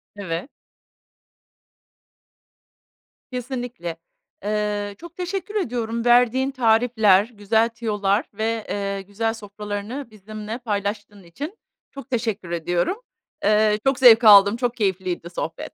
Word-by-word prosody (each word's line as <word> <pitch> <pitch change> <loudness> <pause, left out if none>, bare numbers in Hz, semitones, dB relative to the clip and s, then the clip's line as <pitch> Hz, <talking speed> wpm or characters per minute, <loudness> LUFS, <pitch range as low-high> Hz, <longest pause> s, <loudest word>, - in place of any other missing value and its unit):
Evet. 185 - -4 2.8
Kesinlikle. 245 -9 -5 0.5
Eee, 205 -1 -2
çok 345 +1 -12
teşekkür 380 +3 -4
ediyorum, 235 - -2
verdiğin 245 +2 +4
tarifler, 225 -5 +4
güzel 220 +3 +1
tüyolar 215 0 -1
ve, 220 +1 -2
eee, 200 -1 -2
güzel 215 +3 -2
sofralarını, 210 +4 -6
bizimle 215 +2 -7
paylaştığın 205 -3 -4
için. 290 - -7 0.3
Çok 275 0 -10
teşekkür 220 -7 -2
ediyorum. 175 - -1 0.4
Eee, 215 0 +3
çok 270 -1 +2
zevk 240 -2 +8
aldım, 200 0 +8
çok 245 -1 -1
keyifliydi 185 -5 -2
sohbet. 165 -2 -5
215 Hz, 105 wpm, -23 LUFS, 200-245 Hz, 2.8 s, zevk